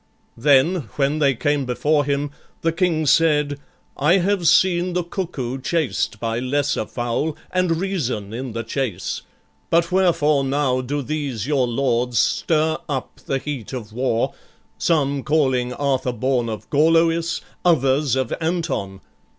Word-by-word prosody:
Then, 140 Hz, -, +3 dB
when 145 Hz, +2 st, +1 dB
they 140 Hz, -3 st, +3 dB
came 145 Hz, +3 st, 0 dB
before 145 Hz, +4 st, +1 dB
him, 140 Hz, 0 st, -1 dB, 0.3 s
the 165 Hz, -, +1 dB
King 165 Hz, -2 st, +1 dB
said, 150 Hz, -2 st, +3 dB, 0.4 s
"I 160 Hz, +7 st, +3 dB
have 190 Hz, -1 st, +1 dB
seen 175 Hz, +1 st, +3 dB
the 180 Hz, 0 st, 0 dB
cuckoo 145 Hz, -8 st, -4 dB
chased 130 Hz, -8 st, -1 dB
by 115 Hz, +1 st, -2 dB
lesser 130 Hz, -3 st, 0 dB
fowl, 125 Hz, +6 st, -2 dB
And 180 Hz, -3 st, +1 dB
reason 130 Hz, -, -2 dB
in 125 Hz, 0 st, -5 dB
the 115 Hz, 0 st, -3 dB
chase: 115 Hz, -5 st, -3 dB, 0.5 s
but 170 Hz, +1 st, +2 dB
wherefore 165 Hz, -6 st, +3 dB
now 135 Hz, -2 st, +1 dB
Do 140 Hz, +3 st, -3 dB
these 140 Hz, -6 st, -3 dB
your 135 Hz, -3 st, +1 dB
lords 120 Hz, -1 st, 0 dB
stir 160 Hz, +7 st, +2 dB
up 135 Hz, -3 st, -4 dB
the 135 Hz, -, +1 dB
heat 135 Hz, -4 st, -6 dB
of 110 Hz, -4 st, -6 dB
war, 120 Hz, -1 st, 0 dB, 0.5 s
Some 140 Hz, -4 st, +1 dB
calling 130 Hz, -4 st, +1 dB
Arthur 130 Hz, -2 st, -1 dB
born 125 Hz, 0 st, 0 dB
of 110 Hz, -1 st, -6 dB
Gorloïs, 165 Hz, +2 st, +3 dB, 0.2 s
Others 140 Hz, -5 st, +3 dB
of 130 Hz, -3 st, -1 dB
Anton? 160 Hz, -, -2 dB
140 Hz, 140 wpm, -21 LUFS, 125-165 Hz, 0.5 s, Then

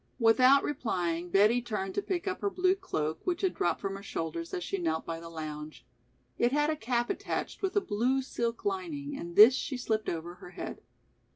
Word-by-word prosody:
Without 255 Hz, +4 st, +6 dB
replying 180 Hz, -, -2 dB
Betty 210 Hz, +6 st, +4 dB
turned 210 Hz, -5 st, -3 dB
to -, -, 0 dB
pick 370 Hz, -2 st, -3 dB
up 380 Hz, -, -2 dB
her 405 Hz, -, +1 dB
blue 370 Hz, -1 st, +2 dB
cloak 155 Hz, -, -3 dB
which 360 Hz, -1 st, -1 dB
had 380 Hz, -, +2 dB
dropped 175 Hz, -, 0 dB
from 195 Hz, -1 st, -3 dB
her 195 Hz, -, -8 dB
shoulders 165 Hz, -3 st, -4 dB
as 180 Hz, -, -3 dB
she 195 Hz, -, -2 dB
knelt 160 Hz, -2 st, -1 dB
by 165 Hz, 0 st, -4 dB
the 165 Hz, 0 st, -9 dB
lounge. 155 Hz, -1 st, -7 dB, 0.5 s
It 240 Hz, -, +3 dB
had 295 Hz, +2 st, +2 dB
a -, -, -1 dB
cap 240 Hz, -2 st, 0 dB
attached -, -, -4 dB
with 385 Hz, 0 st, -1 dB
a 410 Hz, -, +4 dB
blue 250 Hz, -, 0 dB
silk 235 Hz, -, -3 dB
lining 325 Hz, -8 st, -3 dB
and 170 Hz, -9 st, -7 dB
this 220 Hz, +5 st, +10 dB
she 265 Hz, 0 st, -2 dB
slipped 220 Hz, -3 st, -1 dB
over 170 Hz, +1 st, -4 dB
her -, -, -9 dB
head. -, -, -7 dB
230 Hz, 205 wpm, -30 LUFS, 175-285 Hz, 0.5 s, this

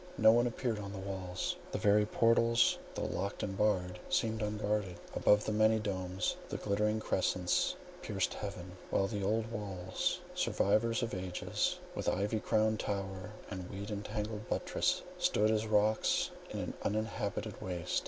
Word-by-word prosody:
No 110 Hz, 0 st, +8 dB
one 120 Hz, +2 st, +4 dB
appeared 120 Hz, -2 st, -1 dB
on 100 Hz, -1 st, -5 dB
the -, -, -5 dB
walls; 95 Hz, -2 st, -3 dB, 0.2 s
the -, -, -1 dB
very 105 Hz, 0 st, +4 dB
portals, 115 Hz, +1 st, +4 dB, 0.2 s
though -, -, -2 dB
locked 100 Hz, +2 st, -2 dB
and 95 Hz, -2 st, -2 dB
barred, 90 Hz, -3 st, +1 dB
seemed 110 Hz, 0 st, +1 dB
unguarded; 105 Hz, -2 st, -1 dB, 0.2 s
above, 105 Hz, 0 st, +4 dB
the -, -, 0 dB
many 110 Hz, +1 st, +4 dB
domes 95 Hz, -3 st, -1 dB
and -, -, -3 dB
glittering 105 Hz, +1 st, +1 dB
crescents 90 Hz, -3 st, +1 dB, 0.3 s
pierced -, -, -1 dB
heaven; 90 Hz, 0 st, -6 dB, 0.2 s
while 95 Hz, -, +2 dB
the 100 Hz, 0 st, -3 dB
old 110 Hz, +3 st, 0 dB
walls, 95 Hz, -5 st, -2 dB
survivors 115 Hz, +4 st, +2 dB
of 115 Hz, -, -2 dB
ages, 90 Hz, -1 st, -1 dB, 0.2 s
with -, -, -1 dB
ivy 105 Hz, +4 st, 0 dB
crowned 110 Hz, 0 st, +2 dB
tower 95 Hz, -2 st, -3 dB, 0.2 s
and 95 Hz, -2 st, -5 dB
weed 100 Hz, +2 st, -5 dB
tangled 105 Hz, 0 st, -4 dB
buttress, -, -, +1 dB, 0.2 s
stood 110 Hz, +1 st, +3 dB
as 110 Hz, 0 st, +1 dB
rocks 110 Hz, 0 st, +3 dB, 0.2 s
in -, -, -4 dB
an -, -, -3 dB
uninhabited 105 Hz, -1 st, -2 dB
waste. 90 Hz, -2 st, -1 dB
105 Hz, 155 wpm, -34 LUFS, 95-110 Hz, 0.3 s, No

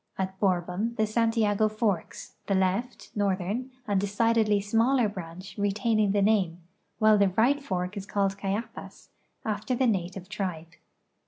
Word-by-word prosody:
At 190 Hz, 0 st, -3 dB
Borhon 185 Hz, +4 st, 0 dB
the 220 Hz, -, +2 dB
Santiago 215 Hz, -1 st, +2 dB
forks, 215 Hz, -5 st, -2 dB
the 195 Hz, -, +2 dB
left 190 Hz, +6 st, -1 dB
(northern) 200 Hz, +5 st, -1 dB, 0.2 s
and 200 Hz, -2 st, +1 dB
decidedl}' 210 Hz, +1 st, +2 dB
smaller 230 Hz, +3 st, +3 dB
branch 185 Hz, -1 st, -8 dB
retaining 210 Hz, +1 st, +1 dB
the 200 Hz, 0 st, +2 dB
name, 195 Hz, -5 st, +2 dB, 0.4 s
while 215 Hz, -1 st, +5 dB
the 200 Hz, -1 st, +4 dB
right 240 Hz, +9 st, +2 dB
fork 185 Hz, -5 st, -3 dB
is 200 Hz, -1 st, -6 dB
called 195 Hz, -1 st, 0 dB
Cayapas, 205 Hz, +4 st, -5 dB, 0.4 s
after 215 Hz, +3 st, -1 dB
the 260 Hz, -, +2 dB
native 185 Hz, -4 st, -1 dB
tribe. 185 Hz, -6 st, -4 dB
205 Hz, 140 wpm, -27 LUFS, 190-220 Hz, 0.4 s, while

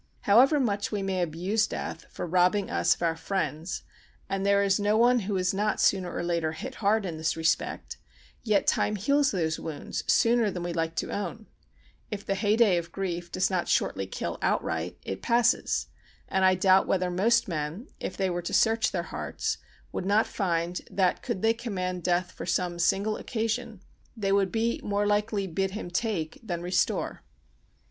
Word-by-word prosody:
However 260 Hz, +9 st, +5 dB
much 205 Hz, -5 st, 0 dB
we 205 Hz, -2 st, -2 dB
may 190 Hz, -1 st, -1 dB
abuse 180 Hz, +7 st, 0 dB
death -, -, -5 dB
for -, -, -5 dB
robbing 180 Hz, +3 st, +2 dB
us -, -, +3 dB
of -, -, -7 dB
our 165 Hz, -1 st, +1 dB
friends—and 185 Hz, +2 st, -4 dB
there 200 Hz, 0 st, +4 dB
is 195 Hz, 0 st, +2 dB
no 205 Hz, +1 st, +2 dB
one 245 Hz, +2 st, +5 dB
who 200 Hz, -2 st, -2 dB
is 185 Hz, 0 st, +1 dB
not 210 Hz, +2 st, 0 dB
sooner 185 Hz, -3 st, +2 dB
or -, -, -3 dB
later 170 Hz, -2 st, 0 dB
hit 260 Hz, +11 st, -6 dB
hard 210 Hz, 0 st, +2 dB
in 170 Hz, -4 st, -4 dB
this 160 Hz, +1 st, -1 dB
respect—yet 200 Hz, +5 st, -2 dB
time 210 Hz, -, +2 dB
heals 280 Hz, +8 st, +2 dB
these 160 Hz, -4 st, -1 dB
wounds 155 Hz, -3 st, -5 dB
sooner 235 Hz, -2 st, +4 dB
than 180 Hz, -2 st, -4 dB
we 175 Hz, 0 st, -3 dB
like 165 Hz, -1 st, -2 dB
to -, -, -2 dB
own; 205 Hz, +2 st, -4 dB, 0.6 s
if 205 Hz, -1 st, -5 dB
the -, -, 0 dB
heyday 205 Hz, 0 st, +3 dB
of 170 Hz, 0 st, -4 dB
grief 175 Hz, -3 st, -4 dB
does 185 Hz, +1 st, +1 dB
not 180 Hz, -2 st, 0 dB
shortly 95 Hz, -, 0 dB
kill -, -, -4 dB
outright, 80 Hz, +2 st, -1 dB
it 95 Hz, -, -5 dB
passes; 235 Hz, +1 st, +2 dB, 0.4 s
and 190 Hz, 0 st, 0 dB
I 185 Hz, 0 st, +5 dB
doubt 190 Hz, +1 st, +4 dB
whether 180 Hz, -1 st, +1 dB
most 230 Hz, +6 st, +3 dB
men, 160 Hz, -, -3 dB
if -, -, -5 dB
they 190 Hz, -2 st, 0 dB
were 175 Hz, 0 st, -2 dB
to 175 Hz, -, -5 dB
search 225 Hz, 0 st, +3 dB
their -, -, -2 dB
hearts, -, -, -3 dB, 0.3 s
would 185 Hz, -, -3 dB
not 210 Hz, +2 st, +4 dB
find 175 Hz, -3 st, -1 dB
that, 185 Hz, -2 st, +1 dB
could 190 Hz, -, -4 dB
they 225 Hz, 0 st, +4 dB
command 185 Hz, -6 st, -3 dB
death 175 Hz, +1 st, 0 dB
for -, -, -8 dB
some 175 Hz, -1 st, 0 dB
single 200 Hz, +5 st, +1 dB
occasion, 225 Hz, -3 st, -3 dB, 0.4 s
they 195 Hz, -3 st, 0 dB
would 195 Hz, -1 st, +2 dB
be 230 Hz, +1 st, 0 dB
more 205 Hz, 0 st, 0 dB
likely 205 Hz, 0 st, +1 dB
to 180 Hz, -, -9 dB
bid 190 Hz, +2 st, 0 dB
him 175 Hz, -, -6 dB
take 175 Hz, -5 st, -2 dB
than 175 Hz, -6 st, -4 dB
restore. 180 Hz, +1 st, 0 dB
195 Hz, 185 wpm, -27 LUFS, 175-215 Hz, 0.6 s, However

